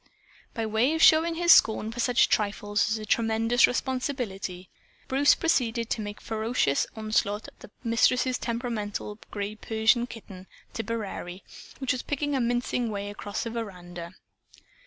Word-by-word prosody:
By 225 Hz, -, -1 dB
way 225 Hz, +8 st, +2 dB
of 320 Hz, -, -1 dB
showing 325 Hz, +1 st, +6 dB
his 345 Hz, +1 st, +4 dB
scorn 220 Hz, -4 st, +5 dB
for 240 Hz, -, -8 dB
such 245 Hz, 0 st, +3 dB
trifles 205 Hz, 0 st, 0 dB
as 220 Hz, -, 0 dB
a 215 Hz, -, -6 dB
"tremendous 225 Hz, +2 st, +3 dB
responsibility," 245 Hz, -9 st, -3 dB, 0.4 s
Bruce 275 Hz, +2 st, +4 dB
proceeded 235 Hz, -8 st, 0 dB
to 225 Hz, -, 0 dB
make 205 Hz, 0 st, -6 dB
a -, -, -20 dB
ferocious 220 Hz, -, 0 dB
onslaught 215 Hz, -1 st, -1 dB
at -, -, -16 dB
the -, -, -12 dB
Mistress's 250 Hz, +2 st, +2 dB
temperamental 225 Hz, -3 st, -4 dB
gray 205 Hz, 0 st, -4 dB
Persian 220 Hz, +2 st, +1 dB
kitten, 190 Hz, -6 st, -11 dB, 0.3 s
"Tipperary," 205 Hz, -5 st, -5 dB, 0.3 s
which 265 Hz, -2 st, -1 dB
was 255 Hz, -, -2 dB
picking 290 Hz, 0 st, -2 dB
a 265 Hz, -, +1 dB
mincing 240 Hz, 0 st, 0 dB
way 205 Hz, -1 st, -4 dB
across 205 Hz, 0 st, -5 dB
the 230 Hz, -, -4 dB
veranda. 180 Hz, -6 st, -7 dB
225 Hz, 150 wpm, -27 LUFS, 205-245 Hz, 0.4 s, showing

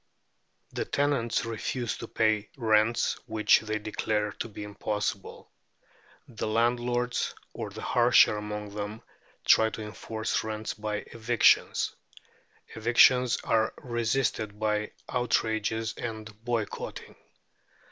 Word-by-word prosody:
The -, -, -1 dB
tenants 140 Hz, -6 st, 0 dB
refuse 115 Hz, +1 st, -3 dB
to 115 Hz, -, -6 dB
pay 110 Hz, -2 st, +1 dB
rents 110 Hz, -1 st, +2 dB
which 110 Hz, -1 st, +4 dB
they 110 Hz, -1 st, -3 dB
declare 105 Hz, 0 st, -1 dB
to -, -, -2 dB
be 105 Hz, 0 st, -8 dB
impossible. 105 Hz, -1 st, -4 dB, 0.8 s
The 110 Hz, -2 st, -4 dB
landlords, 120 Hz, +2 st, 0 dB, 0.2 s
or -, -, -5 dB
the -, -, -9 dB
harsher -, -, +5 dB
among 105 Hz, -1 st, -5 dB
them, 105 Hz, +2 st, -5 dB, 0.4 s
try 110 Hz, 0 st, +6 dB
to 110 Hz, -, -6 dB
enforce 110 Hz, +1 st, -3 dB
rents 110 Hz, -1 st, -4 dB
by 105 Hz, -1 st, -4 dB
evictions; 115 Hz, +1 st, +3 dB, 0.8 s
evictions 120 Hz, +2 st, +5 dB
are 110 Hz, -1 st, +1 dB
resisted 115 Hz, -3 st, -1 dB
by 105 Hz, -1 st, -1 dB
outrages 110 Hz, -2 st, 0 dB
and 110 Hz, -3 st, -5 dB, 0.2 s
boycotting. 115 Hz, -3 st, -4 dB
110 Hz, 105 wpm, -28 LUFS, 105-120 Hz, 0.8 s, try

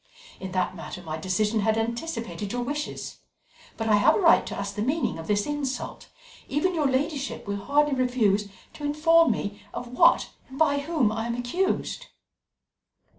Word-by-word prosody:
In 190 Hz, -1 st, -6 dB
that 185 Hz, 0 st, 0 dB
matter -, -, -8 dB
my 155 Hz, -1 st, -5 dB
decision 210 Hz, +6 st, 0 dB
had 220 Hz, +1 st, +2 dB
anticipated 230 Hz, -3 st, -3 dB
your 245 Hz, 0 st, -2 dB
wishes. 295 Hz, +4 st, -4 dB, 0.6 s
But 225 Hz, -, -2 dB
I 210 Hz, -1 st, +5 dB
have 205 Hz, -, +5 dB
a -, -, +1 dB
right 335 Hz, -4 st, +6 dB
to -, -, -5 dB
ask 200 Hz, 0 st, -3 dB
the 205 Hz, -, -4 dB
meaning 270 Hz, -, 0 dB
of 160 Hz, -, -8 dB
this 205 Hz, -1 st, +1 dB
insult; 285 Hz, -3 st, -4 dB, 0.4 s
even 330 Hz, +6 st, +1 dB
your 310 Hz, -4 st, +1 dB
ladyship 275 Hz, +1 st, -2 dB
will 200 Hz, 0 st, -2 dB
hardly 295 Hz, +1 st, +2 dB
refuse 230 Hz, -6 st, +1 dB, 0.2 s
to 295 Hz, -, -11 dB
inform 325 Hz, +3 st, +4 dB
me 205 Hz, 0 st, -2 dB
of 245 Hz, -, -5 dB
what -, -, +4 dB, 0.2 s
and 265 Hz, -, -10 dB
by 285 Hz, -2 st, +3 dB
whom 280 Hz, -7 st, +1 dB
I 225 Hz, +1 st, -2 dB
am 235 Hz, -, -2 dB
accused." 245 Hz, +11 st, -1 dB
245 Hz, 175 wpm, -26 LUFS, 210-295 Hz, 0.6 s, right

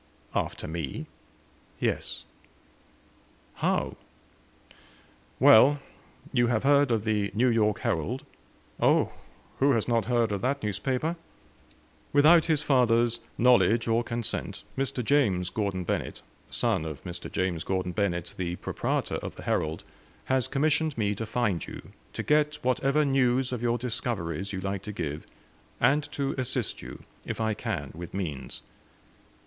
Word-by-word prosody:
"After -, -, -2 dB
me?" 80 Hz, -4 st, -4 dB, 0.7 s
"Yes." -, -, -2 dB, 1.3 s
"How?" -, -, 0 dB, 1.4 s
"Well. 130 Hz, +6 st, +7 dB, 0.6 s
You 120 Hz, 0 st, +3 dB
have 115 Hz, -1 st, +1 dB
heard 140 Hz, 0 st, +5 dB
of 115 Hz, -3 st, +1 dB
the 105 Hz, -2 st, 0 dB
'New 125 Hz, +4 st, +4 dB
York 105 Hz, -3 st, +2 dB
Herald?'" -, -, -1 dB, 0.5 s
"Oh -, -, +3 dB, 0.5 s
who 140 Hz, +1 st, +4 dB
has 115 Hz, -3 st, 0 dB
not 115 Hz, -2 st, +1 dB
heard 120 Hz, -3 st, +2 dB
of 100 Hz, -, -2 dB
that 140 Hz, +1 st, -1 dB
newspaper?" 130 Hz, -, -1 dB, 1.0 s
"Without 155 Hz, +3 st, +6 dB
his 155 Hz, -3 st, +1 dB
father's 120 Hz, -3 st, +3 dB, 0.2 s
knowledge 120 Hz, -1 st, +4 dB
or 115 Hz, +1 st, +2 dB
consent, 115 Hz, -2 st, -4 dB
Mr. 130 Hz, -3 st, -1 dB
James 100 Hz, -10 st, +2 dB
Gordon 100 Hz, -4 st, -1 dB
Bennett, -, -, -3 dB, 0.3 s
son -, -, 0 dB
of 80 Hz, -4 st, -6 dB
Mr. 90 Hz, -1 st, -7 dB
James 90 Hz, -3 st, -1 dB
Gordon 95 Hz, -1 st, -1 dB
Bennett, 90 Hz, -3 st, -1 dB
the 90 Hz, -1 st, -2 dB
proprietor -, -, -2 dB
of -, -, -6 dB
the -, -, -10 dB
'Herald,' 80 Hz, +1 st, -1 dB, 0.4 s
has 130 Hz, -2 st, +2 dB
commissioned 150 Hz, +1 st, +1 dB
me 105 Hz, -2 st, +1 dB
to 110 Hz, +2 st, -5 dB
find 105 Hz, -8 st, 0 dB
you -, -, -9 dB, 0.2 s
to -, -, -3 dB
get 150 Hz, 0 st, +2 dB
whatever 135 Hz, +4 st, +2 dB
news 130 Hz, -2 st, +2 dB
of 125 Hz, -2 st, -3 dB
your 120 Hz, 0 st, +1 dB
discoveries 100 Hz, -7 st, -3 dB
you 95 Hz, -2 st, -4 dB
like 95 Hz, 0 st, -3 dB
to 105 Hz, -, -6 dB
give 75 Hz, -7 st, -4 dB, 0.5 s
and 150 Hz, +2 st, +4 dB
to 140 Hz, -2 st, -1 dB
assist 125 Hz, -4 st, 0 dB
you, -, -, -9 dB, 0.2 s
if -, -, -5 dB
I 110 Hz, -1 st, +1 dB
can, -, -, -4 dB
with 85 Hz, +2 st, -8 dB
means." 75 Hz, -9 st, -4 dB
115 Hz, 140 wpm, -28 LUFS, 95-130 Hz, 1.4 s, Well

